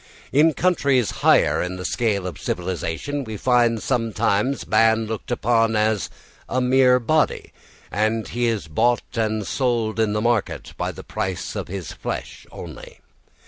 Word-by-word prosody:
In 150 +2 +4
countries 140 - +2
higher - - +4
in 90 +1 -3
the 90 0 -6
scale 105 -2 0
of 90 - -6
civilisation 90 - -3
we 110 -3 -6
find 120 -1 +2
sometimes 115 0 0
man 115 0 +3
looked 110 -1 -6
upon 115 -2 +2
as 105 -1 +1 0.4
a 130 - 0
mere 125 0 +4
body, 155 +6 0 0.4
and 110 +2 0
he 120 0 0
is 110 -7 -1
bought 120 +11 +1
and 110 -2 -1
sold 115 -4 -1
in 110 -2 +2
the 105 - 0
market 115 -2 -1
by - - -2
the - - -10
price 95 -2 -4
of - - -4
his 95 -1 -6
flesh - - -6
only. - - -10
115 Hz, 150 wpm, -22 LUFS, 105-125 Hz, 0.4 s, In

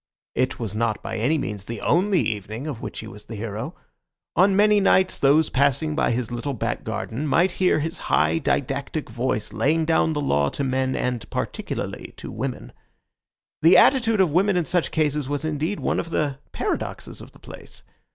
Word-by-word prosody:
It 130 - 0
was 110 -5 -4
not 110 -1 -1
by - - -4
any 130 +9 +2
means 105 -8 -4
the 115 0 -5
only 185 +2 +2
evening 110 +4 -3
of 145 -7 -5
which - - -6
he 110 - -9
was 105 -1 -11
the 115 - -8
hero. 110 - -5 0.6
On 190 +3 +4
many 210 +1 +5
nights 190 -1 +3
those 145 +3 +4
passing 140 +3 +2
by - - +2
his 120 0 -1
little 125 +3 -3
back 110 - -2
garden 140 +7 -3
might 175 +6 +3
hear 180 -4 +4
his 165 +4 -4
high, 165 - +3
didactic 140 +1 -2
voice 120 -4 -2
laying 150 +9 +1
down 160 0 +2
the 150 - -2
law 70 - +1
to 140 - -4
men 130 0 0
and 125 -3 -2
particularly - - -4
to - - -8
women. - - -5 0.9
The 165 +3 +7
attitude 225 -6 +5
of 180 -5 +3
women 190 +4 +3
in 175 - +1
such 175 0 0
cases 150 -3 0
was 145 +1 -2
indeed 155 +6 -2
one - - 0
of 165 - -4
the 145 -4 -1
paradoxes - - -4
of - - -12
the - - -18
place. - - -11
145 Hz, 190 wpm, -24 LUFS, 120-165 Hz, 0.9 s, The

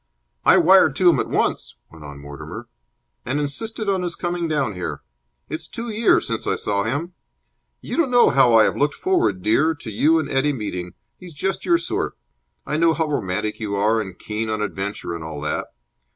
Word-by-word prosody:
"I - - +6
wired - - +5
to - - +5
him - - 0
at - - -2
once," - - -1 0.2
went 80 -2 -13
on 70 -1 -9
Mortimer, 70 0 -9 0.6
"and 130 +5 -1
insisted 215 +10 -2
on 195 -2 +1
his 175 -1 -3
coming 175 -1 -2
down 140 -8 0
here. 90 -1 -5 0.4
It's 160 0 -6
two 235 +1 -6
years 220 +1 +3
since - - -3
I - - +1
saw 100 -1 -1
him. 145 - -3 0.7
You - - -5
don't 330 -6 +2
know 245 -1 +5
how 125 -4 +5
I 110 - +7
have - - +1
looked 145 +1 +1
forward, 355 - 0
dear, 155 +9 +2
to 125 -6 -8
you 155 +10 +3
and 155 -3 -1
Eddie 145 +1 +1
meeting. 90 -7 -5 0.3
He 180 - -11
is 170 - -10
just 190 +7 -2
your 345 -1 +5
sort. - - -3 0.5
I 150 - -2
know 165 0 +3
how 160 -2 -1
romantic 105 -3 -2
you 105 -2 -3
are 110 +3 +2
and 95 -4 -8
keen 110 +1 -4
on 110 0 -1
adventure 100 -3 -4
and 85 -1 -6
all 80 -2 -6
that. 75 - -2
135 Hz, 205 wpm, -22 LUFS, 100-165 Hz, 0.7 s, I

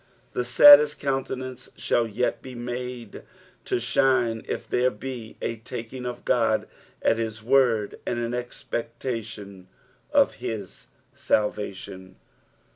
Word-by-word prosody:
The 125 - -1
saddest 145 +4 +8
countenance 130 -1 -3
shall 120 -1 +1
yet 115 +3 -1
be 130 -1 -9
made 120 -2 -6 0.4
to - - 0
shine, 120 -1 +2
if - - -4
there 125 +1 +2
be 120 0 -8
a 115 - -2
taking 125 +2 -7
of 125 0 -7
Qod 115 -3 +2 0.4
at 115 - +3
hia 115 -1 -1
word 120 -5 +2
and 120 - -2
an 120 0 -2
expectation 115 -5 -5 0.4
of - - +4
his 105 -5 -6 0.3
salvation. 95 -3 -2
120 Hz, 120 wpm, -25 LUFS, 110-125 Hz, 0.4 s, saddest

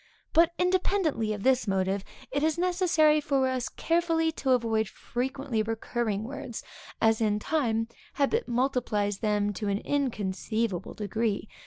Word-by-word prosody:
But, 335 +1 +5
independently 360 - +1
of 210 -2 -4
this 260 -3 +3
motive, 195 0 0 0.3
it 285 +2 0
is 315 +1 +1
necessary 345 -4 +3
for 275 -2 +1
us 255 -2 -1
carefully 330 -1 +1
to 275 -4 -3
avoid 225 -3 +1
frequently 260 -1 -2
recurring 220 -1 -2
words, 260 -1 -6 0.4
as 225 0 +3
in 210 -2 +2
time, 225 -3 0 0.3
habit 370 - +1
multiplies 235 -5 0
them 210 -2 +1
to 205 +2 -4
an 200 0 +1
inconceivable 220 -6 -2
degree. 215 0 -1
240 Hz, 135 wpm, -28 LUFS, 215-300 Hz, 0.4 s, But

